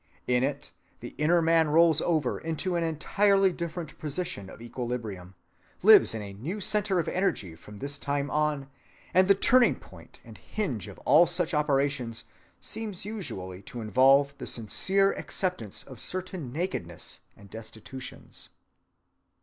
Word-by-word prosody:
In 125 0 +2
it 140 +1 -3 0.3
the 120 - -9
inner 165 +3 +3
man 165 -1 +4
rolls 160 0 +5
over 155 -7 0
into 165 +3 -2
an 170 - +1
entirely 195 +4 +2
different 170 -2 -6
position 150 - -4
of - - -12
equilibrium, 115 -6 -5 0.5
lives - - +7
in 110 - -4
a 100 -1 -8
new 150 - -5
centre 205 -1 +2
of 170 - 0
energy 180 - -1
from 105 +6 -13
this 140 +4 -5
time 140 0 -2
on, 150 -2 0 0.5
and 185 +1 +5
the 200 - +6
turning‐point 245 +5 +1
and - - -13
hinge 130 - -3
of - - -10
all 155 +6 +6
such 175 0 +1
operations 140 -5 0 0.4
seems 210 -5 -6
usually 110 - -6
to 120 +5 -9
involve 135 +5 +4
the - - -5
sincere 190 - +1
acceptance 180 - -4
of 130 -4 -11
certain 185 -7 -4
nakednesses 125 - -5 0.2
and 100 -1 -16
destitutions. 115 +3 -9
145 Hz, 140 wpm, -28 LUFS, 120-180 Hz, 0.5 s, lives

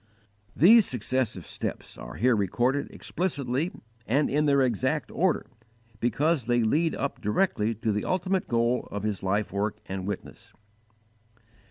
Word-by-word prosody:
"_ - - -37 0.6
These 210 - +7
successive 120 -5 -2
steps - - -5
are - - -9
here 125 +2 +3
recorded 120 +8 0
explicitly 145 -2 -2 0.4
and 140 +6 +2
in 150 +2 +2
their 140 -1 +4
exact 130 +5 0
order 180 -1 +1 0.5
because 135 +3 +1
they 120 -1 +3
lead 155 +9 +2
up 140 - -3
directly 110 - +1
to 110 +1 -1
the 105 0 -1
ultimate 185 +1 0
goal 120 +1 +1
of 105 0 -5
his 105 -3 -2
life 100 +2 -1
work 105 +1 -1
and 95 0 -5
witness. 110 +1 -7
125 Hz, 145 wpm, -27 LUFS, 105-150 Hz, 0.6 s, These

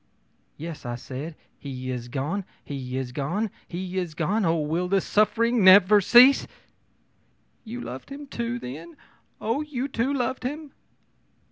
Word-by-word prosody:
ō'Yes!' 160 0 -7
I 120 -1 -4
said, 135 +6 -7 0.2
'he 130 -2 -5
is 120 -1 -5
gone, 145 +11 -2 0.2
he 130 -2 -5
is 130 -2 -3
gone, 175 - -2 0.2
he 185 +1 -4
is 170 -4 -4
gone 190 +6 0
oh, 165 0 +2
will 160 +4 -1
this 195 0 +1
suffering 230 +2 +2
never 200 +2 +8
cease!' 250 +7 +7 1.2
ō'You 245 +3 -6
loved 130 +1 -8
him, 285 +1 -8 0.3
then! 165 - -8 0.4
Oh, 230 +7 -1
you 280 -3 -3
too 260 0 -1
loved 260 -1 -1
him!' 290 +3 -5
185 Hz, 140 wpm, -25 LUFS, 145-235 Hz, 1.2 s, never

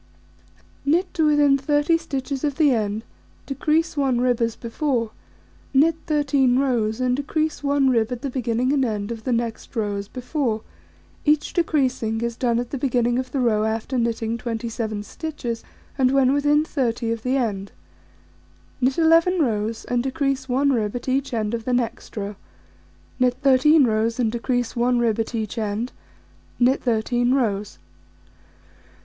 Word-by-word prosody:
Knit 340 +6 +1
to 315 -2 +2
within 290 -2 +4
30 295 +3 +2
stitches 275 -3 -4
of 290 -2 0
the 295 -2 +4
end, 215 -2 -1 0.4
decrease 310 +4 0
1 270 -4 +1
rib 245 -1 +1
as 230 -1 0
before, 235 -1 -2 0.6
knit 315 +5 +5
13 280 -5 +2
rows, 240 -5 +1
and 250 -1 +1
decrease 310 +2 -2
1 280 -1 +2
rib 235 -2 +2
at 245 +1 -5
the 275 - -1
beginning 250 +1 0
and 275 -2 +2
end 210 -2 -2
of 225 -1 -7
the 255 - 0
next 235 +1 -3
row 210 -3 -1
as 200 0 -5
before: 250 -2 -2 0.6
each 300 0 +2
decreasing 260 -9 0
is 235 0 -2
done 235 -1 +1
at 240 0 -3
the 275 - -3
beginning 245 -2 +1
of 255 0 -5
the 275 - -1
row 220 -4 +2
after 220 +4 -2
knitting 230 0 -1
27 225 -2 -3
stitches, 245 -4 -5 0.4
and 255 -1 +4
when 270 0 +3
within 295 +1 +3
30 235 -6 -1
of 230 -1 -3
the 255 +3 0
end; 200 -6 -2 1.1
knit 260 +1 +2
11 330 +2 +4
rows, 220 -5 -1
and 245 -1 0
decrease 270 0 -1
1 275 +3 +2
rib 215 -2 -1
at 245 - -5
each 270 +1 0
end 220 -2 -1
of 230 -1 -2
the 250 - -1
next 240 -2 -2
row; 205 0 -4 0.8
knit 250 -1 +3
13 280 +3 +5
rows, 225 +1 0
and 230 -3 +1
decrease 245 0 -1
1 245 +1 +2
rib 230 -2 +1
at 225 +1 -2
each 220 0 -3
end; 215 +3 -2 0.7
knit 255 +2 +3
13 240 +2 +1
rows. 210 -6 -1
250 Hz, 165 wpm, -23 LUFS, 230-275 Hz, 1.1 s, knit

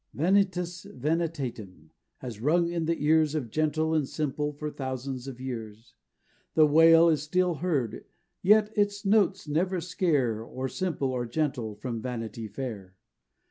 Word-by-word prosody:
"Vanitas 180 +1 +1
Vanitatum" 130 - -3 0.3
has 120 -5 -7
rung 170 +5 +2
in 170 -2 -1
the 165 +1 -1
ears 155 0 +3
Of 125 -8 -3
gentle 155 +2 0
and 150 -4 +1
simple 150 -1 -2
for 150 +1 -5
thousands 130 -1 -5
of 130 -2 -7
years; 115 -3 -7 0.6
The 155 - +7
wail 165 +2 +7
is 155 -4 +2
still 180 +3 +1
heard, 145 -11 -1 0.4
yet 210 +2 +4
its 205 0 0
notes 195 -3 +2
never 180 +5 0
scare 150 - 0
Or 130 +3 -5
simple, 150 -4 -2
or 125 -2 -2
gentle, 120 -5 -2
from 115 +1 -5
Vanity 115 -2 -5
Fair. 105 -5 -7
150 Hz, 140 wpm, -28 LUFS, 125-170 Hz, 0.6 s, The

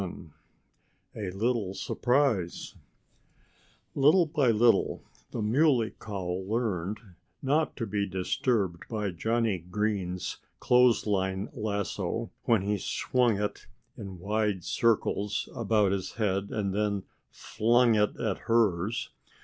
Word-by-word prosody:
VII 85 -4 -7 0.8
A 105 -4 -4
LITTLE 100 0 -1
SURPRISE 120 -10 0 1.2
Little 155 +6 +5
by 145 -4 +1
little 115 +1 +3 0.3
the 115 - -3
Muley 120 0 +3
Cow 95 -4 -4
learned 105 -2 -1 0.5
not 150 +4 +1
to 115 - -2
be 100 -1 -1
disturbed 95 -1 -1
by 105 -4 -2
Johnnie 110 +2 0
Green's 90 0 -2 0.2
clothesline 105 -5 +2
lasso, 105 - -3
when 115 -5 +3
he 105 0 0
swung 120 +2 +1
it 105 0 -3 0.3
in 95 -2 -8
wide 105 0 -1
circles 105 -2 0
about 105 -3 +2
his 95 -1 -3
head 100 -2 -1
and 100 -3 -2
then 100 -1 0 0.3
flung 120 +2 +2
it 105 -1 +1
at 110 -5 -1
hers. 110 -2 +1
105 Hz, 110 wpm, -28 LUFS, 95-115 Hz, 1.2 s, Little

